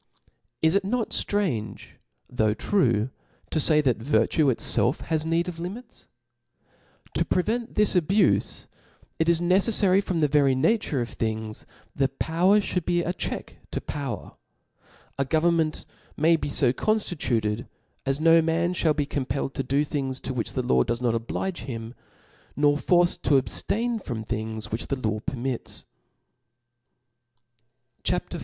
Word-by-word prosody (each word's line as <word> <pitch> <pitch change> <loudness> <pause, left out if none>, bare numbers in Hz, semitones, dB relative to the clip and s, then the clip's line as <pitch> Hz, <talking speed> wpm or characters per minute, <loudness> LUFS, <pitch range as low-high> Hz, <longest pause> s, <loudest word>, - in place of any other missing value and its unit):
Is 160 +1 +4
it 200 0 +2
not 225 +3 -1
ftrange, 180 - -1 0.4
though 110 -4 0
true, 120 - +1 0.4
to 160 - +1
fay, 150 0 +5
that 130 -5 +1
virtue 145 +5 +2
itfelf 130 +2 +3
has 160 -1 -1
need 165 +2 +1
of 170 -2 -6
limits? 195 +9 -8 1.1
To - - +1
prevent 225 +6 -1
this 210 -1 +3
abufe, 185 +4 +2 0.5
it 160 +1 +2
is 170 -1 +4
necefTary 195 +2 +3
from 180 -4 -2
the 150 - +3
very 140 -2 +3
nature 150 - +1
of 120 - -5
thingj, 110 -1 -3 0.5
power 180 +6 +3
(hould 180 -3 -2
be 175 0 +1
a 175 - -2
check - - -5
to - - -3
power. 140 -7 -5 0.9
A - - +3
government 160 +2 +1 0.3
may 165 +3 +4
be 155 - -3
fo 130 -3 +2
conftituted, 125 - -1 0.4
as 135 +1 0
no 165 +1 +6
man 165 +2 0
fhall 160 -4 +1
be 145 - 0
compelled 135 -1 -3
to - - -2
do 140 +3 +1
things 135 -3 -3
to 130 - -4
which 115 -5 -2
the - - -1
law 65 0 +3
does 120 0 -2
not 120 -2 +1
oblige 120 +11 -3
him, 115 -3 -6 0.6
nor 145 0 +3
forced 175 +3 +2
td 140 - +4
ab 130 - +1
ftain 230 0 0
from 115 -4 -4
things 110 0 -4
which 110 +2 -3
the 140 - -1
law 110 -4 -2
permits.".. 125 +2 -4 2.2
CHAP. - - -1
V. - - -4
150 Hz, 150 wpm, -25 LUFS, 125-175 Hz, 2.2 s, no